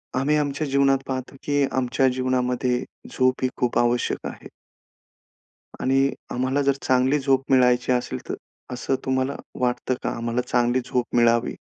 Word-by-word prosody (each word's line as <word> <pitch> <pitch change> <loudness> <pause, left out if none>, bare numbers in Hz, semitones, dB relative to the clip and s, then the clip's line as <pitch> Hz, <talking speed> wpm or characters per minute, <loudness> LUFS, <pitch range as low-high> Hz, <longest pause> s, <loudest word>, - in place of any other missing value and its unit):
आम्ही 140 +4 +2
आमच्या 145 0 -1
जीवनात 135 0 +3
पाहतो 130 0 -4
की 145 -1 +1
आमच्या 130 +1 +1
जीवनामध्ये 125 -1 0 0.3
झोप 130 0 +1
ही 130 - +2
खूप 125 -1 0
आवश्यक 120 0 0
आहे. - - -9 1.3
आणि 135 +1 +2 0.2
आम्हाला 130 +3 0
जर 140 0 +3
चांगली 130 +3 +2
झोप 135 -1 +2
मिळायची 125 -1 +4
असेल 120 - -1
तर - - -1 0.4
असं 125 +2 -1
तुम्हाला 130 +1 0 0.3
वाटतं 125 +1 0
का - - 0
आम्हाला 115 +1 -1
चांगली 120 +1 +2
झोप 125 -1 -2
मिळावी? 120 -1 +3
130 Hz, 145 wpm, -24 LUFS, 125-135 Hz, 1.3 s, मिळायची